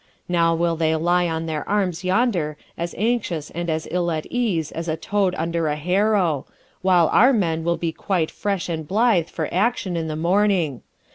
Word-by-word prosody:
Now 170 -1 +2
will 170 0 +1
they 160 0 +1
lie 175 +2 +2
on 165 0 -2
their 155 -2 -3
arms 190 -4 0
yonder 185 -6 +1 0.2
as 170 0 -4
anxious 205 -8 -1
and 170 +1 -4
as 160 0 -2
ill 175 -1 0
at 155 -2 -2
ease 205 -11 0
as 165 +1 -5
a 160 0 -1
toad 195 +1 0
under 165 0 -1
a 150 - 0
harrow, 180 -1 +1 0.3
while 180 -3 +4
our 250 +5 +5
men 165 -9 0
will 170 +1 0
be 165 -1 -2
quite 170 -1 -1
fresh 200 -3 -2
and 160 -3 -4
blithe 205 -3 +2
for 160 -3 -3
action 195 -1 0
in 165 -1 -2
the 155 - -3
morning. 175 - +1
170 Hz, 190 wpm, -22 LUFS, 160-195 Hz, 0.3 s, our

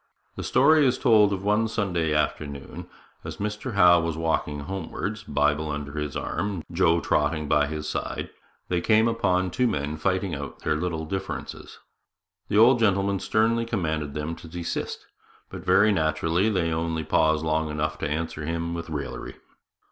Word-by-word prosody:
The - - -5
story 150 +4 +4
is 130 -2 +3
told 110 -5 +5
that 100 -1 -3
one 105 +2 +2
Sunday 95 -8 -1
afternoon, 70 -2 -3 0.3
as - - -7
Mr 105 +4 -4
Howe 90 -3 +6
was 85 -1 -2
walking 80 -3 -1
homewards, 95 +4 -4
Bible 75 -1 0
under 75 -1 -4
his 75 -2 -4
arm, 100 -5 -3
Joe 85 -1 +3
trotting 75 +1 0
by 75 0 +3
his 75 0 -5
side, - - -4 0.4
they 90 -1 0
came 110 +4 +4
upon 95 -5 +1
two 125 +8 +1
men 75 -6 -2
fighting 95 +2 -1
out 70 -1 -6
their - - +1
little 80 0 -2
differences. 95 +4 -6 0.7
The 105 - 0
old 120 +3 +6
gentleman 100 -2 +2
sternly 115 +3 +1
commanded 80 -10 -2
them 75 +2 -3
to - - -12
desist, 85 0 -4 0.5
but, - - -8
very 105 +2 +4
naturally, 80 +3 +1
they 90 -6 0
only 80 0 -2
paused 80 +1 +2
long 80 0 0
enough 75 +1 -2
to - - -2
answer 75 0 -3
him 85 +2 -2
with 85 -1 -5
raillery. 75 -2 -5
85 Hz, 165 wpm, -25 LUFS, 75-100 Hz, 0.7 s, Howe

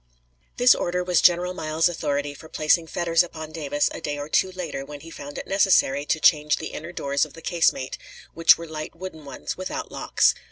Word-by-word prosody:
] - - -41
This 245 +1 +7
order 180 +1 -1
was 180 -1 +2
General 180 +1 +4
Miles's 160 -1 +1
authority 145 -4 -2
for 160 +2 -13
placing 160 +2 +2
fetters 165 0 +2
upon 160 -3 -6
Davis 145 -2 0
a - - -7
day 145 -1 -3
or 145 +1 -6
two 190 +3 +2
later, 175 -7 -5
when 145 +1 -10
he 165 - -11
found 145 -2 -9
it - - -5
necessary 185 -8 +3
to 160 - +1
change 150 -3 +4
the 160 - -5
inner 165 +3 -7
doors 140 -4 0
of 155 - -5
the 165 - -12
casemate, 165 -7 0 0.3
which 165 0 +6
were 170 - -7
light 155 0 -7
wooden 165 -4 -8
ones, 140 - -6
without 310 +13 -5
locks. - - +2
160 Hz, 210 wpm, -24 LUFS, 145-175 Hz, 0.3 s, This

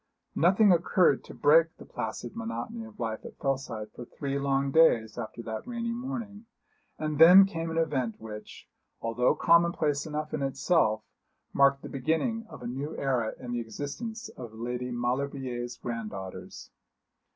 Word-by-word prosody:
Nothing 190 +5 +5
occurred 170 -3 +3
to - - -10
break 160 +3 +4
the - - -12
placid - - -5
monotony 230 0 -5
of 220 -1 -15
life 110 -1 -3
at - - -10
Fellside 130 -6 -3
for 120 - -9
three 140 +3 -4
long 140 0 +1
days 115 -9 +4
after 115 0 -6
that 110 -1 -6
rainy 235 -1 -3
morning; 235 -4 -5 0.5
and 155 -1 -3
then 180 +4 +10
came 165 -4 -4
an 165 - -3
event 135 -8 0
which, 105 -1 -10 0.3
although 120 +4 +1
commonplace 165 -3 +3
enough 155 0 -4
in - - -2
itself, 135 -4 +1 0.5
marked 140 0 +4
the - - -6
beginning 165 - -1
of - - -10
a - - -4
new 135 +5 -4
era 125 -5 0
in 125 -1 -7
the 120 - -1
existence 215 - -6
of 120 -3 -10
Lady 125 +2 -4
Maulevrier's 125 0 -2
granddaughters. 105 -6 -7
140 Hz, 150 wpm, -28 LUFS, 120-170 Hz, 0.5 s, then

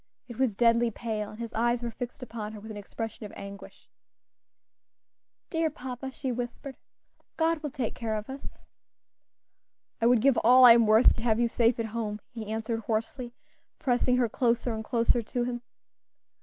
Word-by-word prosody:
It 240 -2 -10
was 255 -6 +1
deadly 235 +1 +4
pale, 215 -2 -4
and 215 - -11
his 230 -1 -6
eyes 240 +1 +1
were 235 - -3
fixed 245 +2 -7
upon 220 -3 -6
her 215 - -8
with 220 +2 -9
an 210 - -7
expression 225 +2 -6
of - - -15
anguish. 200 0 -10 1.6
"Dear 325 -1 +1
papa," 260 -2 -6
she 265 0 -4
whispered, 245 +3 -5 0.6
"God 325 -1 +1
will 300 - -3
take 250 -4 -3
care 225 -2 -3
of 215 0 -5
us." 270 +1 -9 1.4
"I 230 - +4
would 240 -2 +4
give 275 0 +4
all 255 +2 +7
I 235 - +11
am 230 -1 +4
worth 220 +3 +6
to - - -4
have 230 -1 +1
you 240 - +3
safe 230 0 +2
at 230 - 0
home," 215 -3 -3
he 225 -4 -7
answered 225 +1 -2
hoarsely, 235 +3 -3 0.4
pressing 250 -3 +1
her 245 -2 +3
closer 235 +1 0
and 220 0 -4
closer 235 +1 +2
to 240 +2 -2
him. 240 0 -3
235 Hz, 180 wpm, -28 LUFS, 220-250 Hz, 1.6 s, I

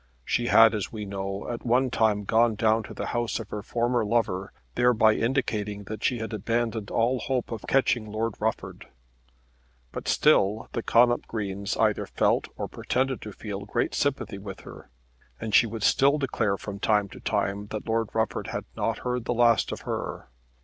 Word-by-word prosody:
She 120 0 0
had, 115 -1 +7
as 105 -3 -3
we 105 -2 -5
know, 100 0 -4
at 120 -1 -5
one 125 +1 +2
time 105 -3 +2
gone 115 +2 +3
down 110 +1 +2
to - - -9
the - - -4
house 120 -1 -1
of 110 -3 -8
her 105 - -4
former 120 +2 0
lover, 105 -3 0 0.2
thereby 120 -3 +4
indicating 105 -5 -1
that 105 +2 -7
she 125 - +1
had 110 0 -5
abandoned 110 0 -1
all 120 +3 +1
hope 125 -2 -2
of 115 -3 -4
catching 125 -4 +2
Lord 110 +1 -1
Rufford. - - -3 1.0
But - - -6
still 105 +3 +3
the 115 - -1
Connop 120 +1 +3
Greens 100 -2 -3
either - - +1
felt - - +1
or - - -3
pretended 130 0 -1
to 105 - -7
feel 100 -1 -6
great 120 +3 -1
sympathy 135 -8 -1
with 100 -1 -8
her, - - -12 0.5
and 110 -2 -5
she 115 - +6
would 110 -1 -6
still 140 +6 +4
declare 115 -8 0
from 100 0 -7
time 105 -1 +2
to - - -11
time 100 +1 -1
that 110 +1 -5
Lord 115 -1 0
Rufford 110 -3 -1
had - - -4
not - - -1
heard 125 -1 -1
the 120 - -1
last 120 -1 +3
of - - -5
her. - - -5
110 Hz, 185 wpm, -26 LUFS, 105-120 Hz, 1.0 s, had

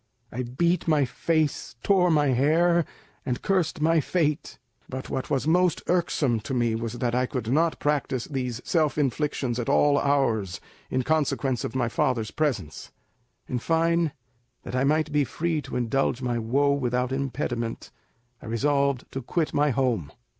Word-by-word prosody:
I 125 - -3
beat 170 +10 0
my 150 -3 +3
face, 155 +1 -1
tore 185 -3 +4
my 150 -3 +3
hair, 160 +6 +3 0.4
and 125 -2 -2
cursed 180 -4 0
my 165 +1 +4
fate; 150 -1 -1 0.3
but 130 0 -6
what 130 - -3
was 140 +1 0
most 180 +1 +2
irksome 155 -9 +1
to 130 +5 -4
me 120 -2 +1
was 115 0 -3
that 120 -1 -2
I 125 +1 +1
could 125 -3 -3
not 165 +2 +2
practise 140 -4 0
these 125 -3 -3
self 155 -4 +1
inflictions 135 -3 -1
at 120 - -2
all 145 -1 +4
hours 115 -10 +1 0.3
in 130 0 0
consequence 140 -4 0
of 115 - -5
my 125 -2 +1
father's 115 -1 0
presence. 115 - -2 0.6
In 125 - -2
fine, 165 +2 +1 0.5
that - - -6
I 130 - +2
might 155 +2 +2
be 145 0 +3
free 160 +3 -2
to - - -8
indulge 125 +1 0
my 120 -2 -1
woe 135 +6 +2
without 125 -2 -1
impediment, 130 -4 -3 0.5
I - - -10
resolved 140 +3 +1
to 135 - -4
quit 155 +6 -1
my 145 +1 +3
home. 120 - 0
135 Hz, 160 wpm, -26 LUFS, 120-155 Hz, 0.6 s, tore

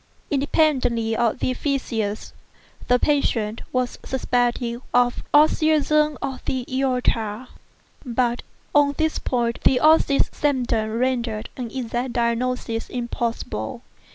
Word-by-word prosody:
Independently 265 -6 +1
of 235 -1 +1
the 255 - -1
phthisis, 230 -7 -2 0.6
the 250 - +5
patient 235 -6 0
was 255 -1 -1
suspected 245 -2 -1
of 245 0 +2
aneurism 305 0 +3
of 265 -1 -4
the 255 -2 -2
aorta; 250 -3 -1 0.5
but 245 -2 0 0.3
on 285 -1 +4
this 315 -1 0
point 235 -2 -1
the 255 - +4
osseous 310 -2 +4
symptoms 245 -6 0
rendered 240 -4 -1
an 245 -3 -5
exact 240 0 -3
diagnosis 235 -1 -1
impossible. 235 - -4
250 Hz, 105 wpm, -23 LUFS, 235-275 Hz, 0.6 s, the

